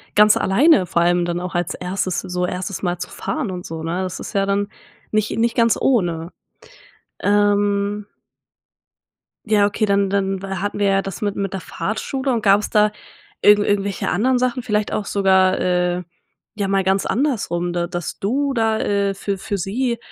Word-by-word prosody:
ganz 210 0 +6
alleine 260 - +4
vor 170 - 0
allem 175 0 +2
dann 175 0 -2
auch, 180 0 -5
als 175 +1 -1
erstes, 185 0 -2
so 180 0 -2
1. 180 +1 -4
Mal 180 -2 -1
zu 175 - -6
fahren 285 -10 -3
und 180 -1 -6
so, 160 0 -6
ne? 170 +3 -2
Das 185 -1 -5
ist - - -7
ja 195 -1 +2
dann 200 +1 0 0.4
nicht 215 0 0
nicht 230 +1 +1
ganz 230 -1 +4
ohne. 175 -9 0 0.9
Ähm 205 0 +1 1.4
Ja, 210 -1 +4
okay, 205 +2 -1
dann 200 -1 +2
dann 195 -1 -1
wa 195 -1 -4
hatten 205 +1 -3
wir 200 - +3
ja 195 0 +2
das 195 +3 -7
mit 205 -1 -1
mit 195 -1 -2
der 190 - -3
Fahrschule 260 +8 -3
und 230 -2 -1
gab's 200 0 +3
da 210 0 +3 0.5
irgend 205 0 +6
irgendwelche 200 -2 0
anderen 250 +6 +2
Sachen, 250 -1 -1
vielleicht 210 -3 -1
auch 210 - -1
sogar, 190 -2 +3
äh, 180 0 +1 0.6
ja 200 - 0
mal 195 0 +1
ganz 190 +1 +1
andersrum, 205 -10 -1
da 175 0 -1
dass 175 -2 -5
du 275 +7 0
da, 225 -2 +1
äh, 200 -1 0
für 195 0 -3
für 200 - -3
sie, 235 +6 -1
200 Hz, 180 wpm, -20 LUFS, 185-210 Hz, 1.4 s, ganz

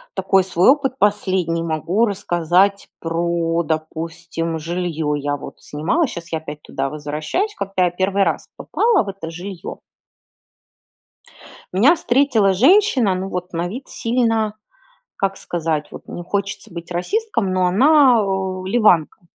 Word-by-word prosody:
такой 190 0 +3
свой 180 +1 +3
опыт 270 -3 0
последний, 190 -6 +1
могу 170 +7 0
рассказать 190 0 +1
про, 170 0 0
допустим, 165 +1 -3
жилье. 165 -2 -2
Я 145 0 -2
вот - - -11
снимала, 165 - 0
щас 170 -7 -8
я 160 - -1
опять 150 -1 -9
туда 135 0 -3
возвращаюсь, 155 - -3
когда 195 -2 0
я 175 - 0
в - - -26
1 195 +1 +2
раз - - -1
попала 450 - +2
в 200 - -7
это 190 -4 -7
жилье 180 +2 -7 2.0
меня 245 - +5
встретила 245 - +2
женщина, 265 - +4
ну, 185 +1 -3
вот 180 0 -5
на 170 +1 -2
вид 250 +8 -8
сильно, 225 -3 0 0.6
как 195 0 -1
сказать. 160 -3 -3
Вот - - -11
не 175 - -7
хочется 200 +2 -4
быть 170 0 -8
расистом, 230 - -1
но 185 -1 +2
она, 255 - +5
о, 190 -1 -2
ливанка. 190 -7 +2
185 Hz, 140 wpm, -20 LUFS, 165-215 Hz, 2.0 s, меня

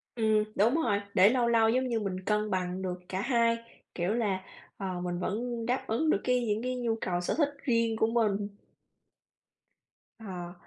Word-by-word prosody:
Ừm, 220 -2 +3
đúng 225 +7 +3
rồi, 220 -11 +1
để 195 0 +7
lâu 245 0 +2
lâu 225 -1 +4
giống 255 +3 +1
như 235 -2 0
mình 195 -3 -3
cân 210 0 +1
bằng 185 0 -1
được 180 -1 -3
cả 190 0 -2
hai, 230 -1 +2 0.4
kiểu 175 +2 0
là, 205 -5 0 0.4
ờ, 185 -2 -4
mình 175 0 -3
vẫn 230 +5 -2
đáp 250 +3 -1
ứng 250 +9 +1
được 205 - +2
cái 250 -1 +1
những 210 +1 0
cái 255 0 -1
nhu 235 -2 0
cầu 175 -1 -1
sở 180 - -1
thích 295 -3 +3
riêng 230 -4 +2
của 220 - +3
mình. 210 -3 +1 1.7
Ờ. 180 -5 -7
220 Hz, 185 wpm, -29 LUFS, 190-235 Hz, 1.7 s, để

